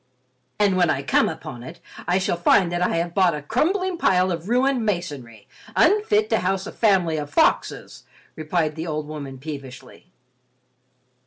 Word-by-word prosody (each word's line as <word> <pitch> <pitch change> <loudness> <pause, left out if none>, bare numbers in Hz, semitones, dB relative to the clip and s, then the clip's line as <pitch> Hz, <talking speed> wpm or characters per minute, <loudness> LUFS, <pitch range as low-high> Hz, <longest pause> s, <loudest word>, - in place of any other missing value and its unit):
"And 200 -3 +2
when 175 -3 +3
I 135 -2 0
come - - +2
upon 120 -2 -8
it, 125 - -10 0.3
I 180 +2 +2
shall 190 -2 0
find 175 +1 +3
that 175 0 -2
I 180 - +1
have 170 +1 -2
bought 185 -4 +3
a 150 - -5
crumbling 355 - 0
pile 185 0 +2
of 170 +3 -5
ruined 255 0 +2
masonry, 145 - -4 0.3
unfit 425 +1 +3
to - - +3
house 190 +1 -1
a 220 - -7
family 185 -7 +2
of 145 -1 -4
foxes," 145 - 0 0.3
replied 155 0 -1
the 160 +2 -6
old 155 -1 -3
woman 140 -3 -7
peevishly. 140 +4 -10
175 Hz, 165 wpm, -23 LUFS, 150-200 Hz, 0.3 s, when